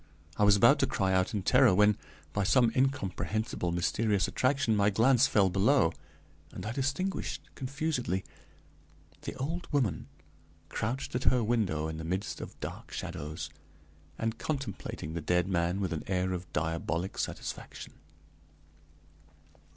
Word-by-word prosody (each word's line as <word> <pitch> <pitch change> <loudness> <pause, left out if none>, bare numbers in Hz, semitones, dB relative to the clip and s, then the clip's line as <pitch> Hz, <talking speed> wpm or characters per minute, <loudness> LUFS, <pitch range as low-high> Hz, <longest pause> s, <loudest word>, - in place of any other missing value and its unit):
I - - +1
was 105 -1 +7
about 100 - +6
to - - +3
cry 95 -1 0
out 95 +3 +1
in 100 - -1
terror 125 -2 +5
when, 105 +1 +5 0.4
by 100 - +1
some 120 +4 +4
incomprehensible 110 -6 -1
mysterious 100 +4 +1
attraction, 130 -3 +1
my 100 0 +4
glance 120 +5 +4
fell 95 -3 +3
below, 100 - +3 0.6
and 90 - -7
I 110 - -2
distinguished, 140 +5 -2
confusedly, 135 - -2 1.0
the - - -6
old 165 +6 -4
woman 125 - 0 0.6
crouched 120 +6 -3
at 125 - -2
her 125 -2 +4
window 105 -9 0
in 80 0 -5
the 80 - -5
midst 95 +5 -3
of - - -9
dark - - -7
shadows, 75 +2 -5 0.7
and 115 0 -2
contemplating 130 - -4
the 85 - -3
dead 90 +3 +1
man 90 0 0
with 95 -3 -1
an 80 - -3
air 95 -1 0
of 90 0 -6
diabolic 80 +3 -2
satisfaction. - - -5
105 Hz, 140 wpm, -30 LUFS, 90-130 Hz, 1.0 s, was